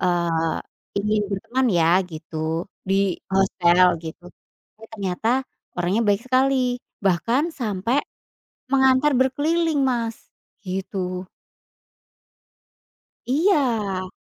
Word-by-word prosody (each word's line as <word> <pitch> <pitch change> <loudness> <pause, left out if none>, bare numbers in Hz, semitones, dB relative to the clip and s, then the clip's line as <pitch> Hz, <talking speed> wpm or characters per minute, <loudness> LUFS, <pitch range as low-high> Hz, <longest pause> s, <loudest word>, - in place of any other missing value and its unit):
eee, 170 -3 +1 0.4
ingin 210 +1 +1
berteman, 230 +6 -1
ya, 175 -1 +4
gitu, 160 +1 -4 0.2
di 195 -2 +1
hostel 180 -2 +3
gitu. 165 +2 -9 0.6
Eh, 225 - -12
ternyata 220 +6 -1 0.3
orangnya 180 +5 +1
baik 205 +3 +2
sekali, 255 -1 +2 0.2
bahkan 235 - +1
sampai 230 0 -1 0.7
mengantar 265 +2 +4
berkeliling 295 +5 +1
Mas, 235 -3 -1 0.5
gitu. 185 -1 -4 2.0
Iya. 240 - +1
205 Hz, 85 wpm, -23 LUFS, 180-260 Hz, 2.0 s, ya